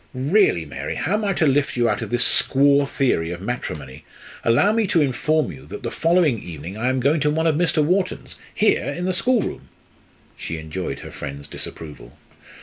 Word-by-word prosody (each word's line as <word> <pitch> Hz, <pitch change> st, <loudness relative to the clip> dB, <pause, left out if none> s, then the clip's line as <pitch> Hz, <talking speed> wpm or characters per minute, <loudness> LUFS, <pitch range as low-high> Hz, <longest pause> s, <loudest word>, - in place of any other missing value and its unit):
"Really, 135 Hz, -, +2 dB
Mary! 70 Hz, -, -5 dB
How 180 Hz, -, -1 dB
am 215 Hz, +1 st, 0 dB
I 200 Hz, -1 st, +1 dB
to 165 Hz, -, +1 dB
lift 140 Hz, -2 st, +1 dB
you 120 Hz, -1 st, +3 dB
out 105 Hz, -2 st, 0 dB
of -, -, -4 dB
this 120 Hz, 0 st, +1 dB
squaw 140 Hz, +1 st, +3 dB
theory 105 Hz, -12 st, +1 dB
of 85 Hz, 0 st, -5 dB
matrimony? 75 Hz, -, -5 dB, 0.4 s
Allow 120 Hz, -, +4 dB
me 220 Hz, -1 st, +1 dB
to 170 Hz, -, +2 dB
inform 150 Hz, -, +1 dB
you 70 Hz, -2 st, -12 dB
that -, -, -8 dB
the -, -, -3 dB
following 165 Hz, -, +2 dB
evening 85 Hz, +2 st, -8 dB
I 120 Hz, +4 st, 0 dB
am 130 Hz, 0 st, 0 dB
going 145 Hz, +5 st, +2 dB
to 150 Hz, 0 st, +2 dB
one 160 Hz, +2 st, 0 dB
of 160 Hz, -, +3 dB
Mr. 160 Hz, -1 st, +2 dB
Wharton's 185 Hz, +3 st, -1 dB, 0.2 s
here -, -, +2 dB
in 175 Hz, -, -3 dB
the 185 Hz, -, 0 dB
schoolroom!" 235 Hz, +5 st, 0 dB, 0.7 s
She 80 Hz, -, -5 dB
enjoyed 80 Hz, -2 st, -5 dB
her -, -, -9 dB
friend's 70 Hz, 0 st, -7 dB
disapproval. 75 Hz, 0 st, -9 dB
135 Hz, 195 wpm, -22 LUFS, -, 0.7 s, Allow